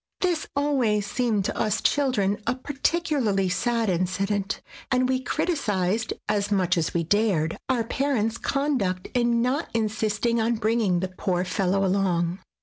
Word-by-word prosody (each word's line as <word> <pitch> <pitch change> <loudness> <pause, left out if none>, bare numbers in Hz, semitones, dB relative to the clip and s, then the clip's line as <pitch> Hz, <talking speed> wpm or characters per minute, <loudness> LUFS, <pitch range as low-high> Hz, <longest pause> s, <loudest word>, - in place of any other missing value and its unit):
This 350 -4 0
always 255 -8 +1
seemed 215 -3 0
to - - -2
us 215 -1 0
children 245 -9 +1
a 240 - +2
particularly 270 - 0
sad 230 +3 0
incident, 195 +2 -1 0.3
and 255 0 +3
we 260 0 +1
criticised 220 - 0
(as 205 -1 0
much 185 -3 +2
as 165 -1 -1
we 170 - +2
dared) 175 -4 +1
our 245 -3 +2
parents' 230 -3 -1
conduct 255 -11 -1
in 235 -1 +2
not 270 +6 0
insist 215 -1 -1
ing 235 -1 +2
on 230 +1 +1
bringing 220 -5 +1
the 190 - -1
poor 185 -1 -1
fellow 195 +1 +1
along. 180 -2 +1
215 Hz, 145 wpm, -25 LUFS, 190-250 Hz, 0.3 s, and